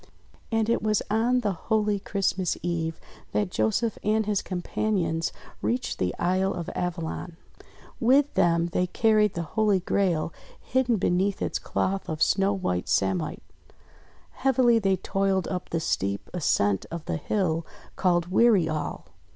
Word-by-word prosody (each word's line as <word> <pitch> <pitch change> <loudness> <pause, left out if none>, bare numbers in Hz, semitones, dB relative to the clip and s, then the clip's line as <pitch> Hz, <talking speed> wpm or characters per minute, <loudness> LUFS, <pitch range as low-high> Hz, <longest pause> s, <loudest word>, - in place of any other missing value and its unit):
And 225 -1 +1
it 230 - +1
was 215 -1 +1
on 240 +3 +2
the 210 -3 0
holy 210 +3 0
Christmas 195 -2 -1
Eve 165 -2 -2 0.3
that 205 -3 0
Joseph 220 +2 0
and 215 +1 +2
his 205 -2 0
companions 180 -2 -1 0.3
reached 250 +1 -1
the 90 0 -1
Isle 185 +2 +1
of 170 -2 -5
Avalon. 170 -1 -4 0.6
With 270 +4 +4
them 170 0 +2
they 180 +1 0
carried 215 +1 +3
the 170 - -2
Holy 215 -3 +3
Grail 175 -3 0 0.3
hidden 255 -2 +1
beneath 190 0 +1
its - - -2
cloth 195 0 -2
of 155 -1 +1
snow 195 +1 +2
white 180 - -2
samite. 95 -2 0 0.9
Heavily 250 -3 +3
they 195 -3 +2
toiled 195 0 0
up 180 -1 -4
the 165 - -1
steep 100 -10 -2
ascent 100 - +1
of 170 -1 -6
the - - -2
hill 165 -1 0 0.3
called 175 -2 +2
Weary 205 -5 +4
All. 155 -1 -3
190 Hz, 145 wpm, -26 LUFS, 170-215 Hz, 0.9 s, With